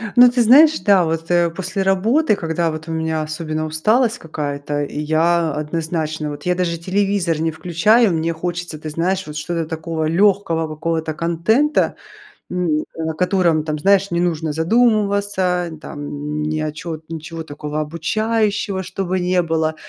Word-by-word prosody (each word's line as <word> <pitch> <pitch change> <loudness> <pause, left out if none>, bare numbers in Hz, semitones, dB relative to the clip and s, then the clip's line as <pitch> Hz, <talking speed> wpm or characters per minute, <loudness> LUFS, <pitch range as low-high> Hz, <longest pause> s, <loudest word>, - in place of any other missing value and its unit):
Ну, 245 0 +8
ты 245 0 +1
знаешь, 295 +7 +6
да. 195 -4 +4
Вот, 165 +1 -3
э, 175 -1 +3
после 190 +3 -3
работы, 215 +8 +2
когда 165 -1 -1
вот 155 +1 -7
у - - -4
меня 160 -1 -1
особенно 155 0 -3
усталость 220 +10 +1
какая-то, 145 -4 -4
и 145 +1 -5
я 160 +1 +1
однозначно, 155 0 -3
вот 145 0 -8
я 180 0 +2
даже 175 -2 -1
телевизор 185 -2 0
не 165 0 0
включаю. 180 +7 +3
Мне 165 +1 0
хочется, 175 -1 -4
ты 155 - -6
знаешь, 185 +5 -1
вот, 150 - -8
что-то 165 +1 -2
такого 160 0 -3
легкого 170 -2 +2
какого-то 160 +1 -2
контента. 170 - +1 0.6
М, 165 -4 0
на 160 0 -3
котором 175 -2 +2
там, 155 -1 -3
знаешь, 195 +4 +3
не 170 - 0
нужно 160 -3 -1
задумываться, 200 -2 +1
там, 145 -2 -7
н 150 +1 -4
ни 155 +1 -1
о 155 -1 -2
чё 160 0 -6
ничего 165 0 -6
такого 150 0 -5
обучающего, 205 +5 -1
чтобы 185 0 -3
не 180 0 +2
было. 160 -1 0
165 Hz, 160 wpm, -19 LUFS, 155-190 Hz, 0.6 s, Ну